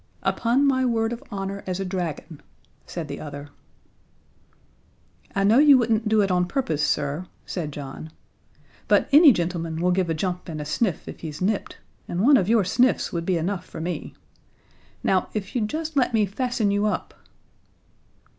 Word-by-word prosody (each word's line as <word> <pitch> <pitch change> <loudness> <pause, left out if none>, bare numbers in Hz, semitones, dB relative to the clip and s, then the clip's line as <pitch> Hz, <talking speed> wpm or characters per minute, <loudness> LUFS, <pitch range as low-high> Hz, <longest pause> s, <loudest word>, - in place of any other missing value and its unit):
"Upon 245 +5 +2
my 260 -2 +2
word 230 -2 +1
of 235 - -7
honor 195 0 -4
as 185 0 -2
a 195 - -2
dragon," 170 -4 -5 0.5
said - - -5
the - - -6
other. 145 -1 -8 1.9
"I 195 - +1
know 215 +6 +5
you 290 -2 +8
wouldn't 225 -2 +1
do 215 -1 +4
it 195 -2 +1
on 180 -1 +2
purpose, 175 - -1
sir," 145 +6 -1 0.2
said 160 -5 -4
John, 140 +2 -8 0.8
"but - - +3
any 295 +1 +9
gentleman 170 -4 -2
will 180 +1 +2
give 180 -1 +1
a 165 - 0
jump 180 +2 -3
and 155 -2 -5
a 150 - -5
sniff 175 +4 -1
if - - -8
he's 155 -3 -7
nipped, 200 +2 -1 0.3
and 175 - -3
one 275 +5 +6
of 190 -3 0
your 225 -2 +4
sniffs 245 +7 +1
would 170 -1 -3
be 185 -2 +2
enough 175 +2 -2
for - - -9
me. 165 -1 -5 0.9
Now, 185 -1 +1
if 200 0 -4
you'd 220 -5 -1
just 315 +2 -4
let 250 -3 +2
me 215 -2 +3
fasten 220 0 -1
you 205 +1 +1
up?" 210 - -3
195 Hz, 175 wpm, -24 LUFS, 170-230 Hz, 1.9 s, any